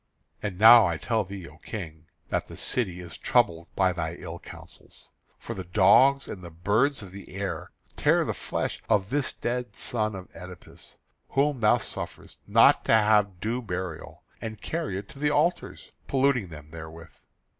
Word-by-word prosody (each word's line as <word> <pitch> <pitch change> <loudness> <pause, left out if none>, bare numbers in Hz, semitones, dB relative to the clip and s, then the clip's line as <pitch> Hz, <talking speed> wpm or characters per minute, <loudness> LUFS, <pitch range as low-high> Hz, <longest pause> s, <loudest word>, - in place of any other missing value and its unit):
And 100 -3 -4
now 110 0 +9
I 85 -2 -1
tell 110 +4 0
thee, 95 -2 -8
O 75 - -15
King, 80 -7 -8 0.2
that - - -1
the - - -11
city 95 -8 -1
is 85 -2 -9
troubled 85 0 +1
by 95 -1 +2
thy 85 -1 -3
ill - - -8
counsels. - - -15 0.3
For - - -7
the 95 - -6
dogs 135 +10 +5
and 95 - -7
the 85 - -9
birds 105 - +1
of 95 - -11
the 95 -1 -11
air 100 0 -4 0.3
tear - - +3
the - - -1
flesh - - -4
of 100 +1 +2
this 145 -1 0
dead 120 -2 -4
son 110 -3 -2
of 95 -1 -8
Oedipus, 90 +1 -10 0.3
whom 140 -1 +1
thou 105 -2 +4
sufferest - - -7
not - - +5
to - - +3
have 105 -4 +3
due 115 +5 -2
burial, 90 -6 -6 0.2
and 110 -1 -6
carry 160 - -3
it 100 +1 -7
to 140 - -12
the 150 0 +2
altars, 155 +4 -1 0.2
polluting 135 -6 +2
them 75 -2 -12
therewith. 80 0 -10
100 Hz, 175 wpm, -27 LUFS, 90-120 Hz, 0.3 s, now